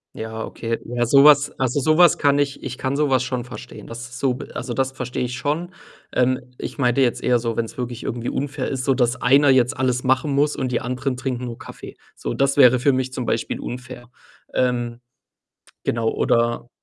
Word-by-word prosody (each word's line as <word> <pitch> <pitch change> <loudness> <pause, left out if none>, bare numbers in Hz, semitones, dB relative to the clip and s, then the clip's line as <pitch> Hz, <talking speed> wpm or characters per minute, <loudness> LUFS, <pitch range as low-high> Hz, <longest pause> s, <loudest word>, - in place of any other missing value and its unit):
Ja, 110 0 -5
okay. 115 0 -4
Ja, 120 0 -1
so 140 +4 +6
was 145 -1 +6
also, 130 +1 0
so 155 +2 +2
was 175 -1 +6
kann 140 0 +3
ich 140 -1 -1
ich 130 -2 -5
kann 130 +1 -2
so 150 -1 +2
was 130 -1 +2
schon 125 -1 -3
verstehen. 125 - -10
Das 120 0 -8
ist 130 - -9
so 130 -2 +1 0.2
also, 125 -1 -4
das 135 +1 0
verstehe 125 -1 -4
ich 125 0 -3
schon. 155 +7 -2 0.4
Ähm, 125 0 0
ich - - -6
meinte 125 -2 +2
jetzt 125 -3 +1
eher 120 -1 +3
so, 115 -1 -2
wenn‘s 115 0 -3
wirklich 125 -1 -5
irgendwie 120 0 -4
unfair 140 +1 -3
ist, 130 -2 -3
sodass 125 -2 +2
einer 140 +3 +5
jetzt 125 -2 +3
alles 125 -1 0
machen 130 +2 +1
muss 145 +2 +1
und 130 -2 -2
die - - 0
anderen 125 +2 -2
trinken 125 -1 -3
nur 120 -1 -6
Kaffee. - - -11 0.2
So, - - -4
das 135 0 +1
wäre 130 -2 +7
für 140 +3 +3
mich 130 -1 -2
zum 125 -1 -3
Beispiel 115 - -2
unfair. 125 0 -8 0.4
Ähm, 120 -2 0 0.8
genau, 115 -1 0
oder 120 0 0
125 Hz, 205 wpm, -22 LUFS, 120-135 Hz, 0.8 s, wäre